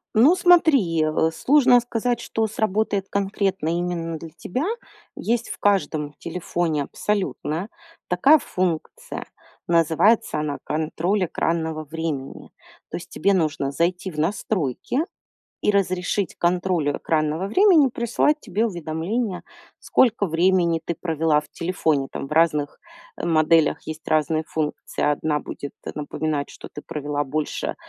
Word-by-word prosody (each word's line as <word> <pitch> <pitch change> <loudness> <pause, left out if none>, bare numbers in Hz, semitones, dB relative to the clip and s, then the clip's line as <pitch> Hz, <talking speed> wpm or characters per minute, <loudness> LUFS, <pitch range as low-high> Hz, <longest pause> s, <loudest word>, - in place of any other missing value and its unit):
Ну 275 +11 +6
смотри, 300 - +4
э, 155 +1 +1
сложно 255 - +5
сказать, 240 0 -1
что 225 - -1
сработает 210 -2 -1
конкретно 195 -4 -1
именно 170 -1 -2
для 165 - -8
тебя. 255 - -3 0.5
Есть 235 +1 -1
в - - -5
каждом 160 -7 +1
телефоне 170 -3 -2
абсолютно 180 - -2 0.4
такая 265 - +6
функция. 185 - -3 0.4
Называется 170 +4 +3
она 150 -1 -2
"контроль 165 +6 0
экранного 160 -1 -2
времени". 155 -3 -5 0.4
То - - -4
есть - - -10
тебе 200 +4 +1
нужно 155 -6 0
зайти 180 +5 -1
в 155 - -7
настройки 170 - -1 0.6
и - - +3
разрешить 190 0 0
контролю 175 -4 +1
экранного 155 +3 0
времени 355 - +5
присылать 240 +6 +1
тебе 220 -2 -1
уведомления, 175 +3 -3 0.4
сколько 225 -5 +2
времени 170 0 +2
ты 170 - -1
провела 160 -2 +1
в - - -17
телефоне. 160 -5 0
Там 135 - -5
в - - -19
разных, 150 -2 +2 0.4
э, - - -4
моделях 160 -1 +3
есть 155 0 -7
разные 155 +1 +1
функции. 155 -2 -4
Одна 150 0 +1
будет 140 0 -7 0.2
напоминать, 150 0 -2
что - - -11
ты 150 - -9
провела 145 -1 -2
больше 150 +2 -3
170 Hz, 125 wpm, -23 LUFS, 155-205 Hz, 0.6 s, Ну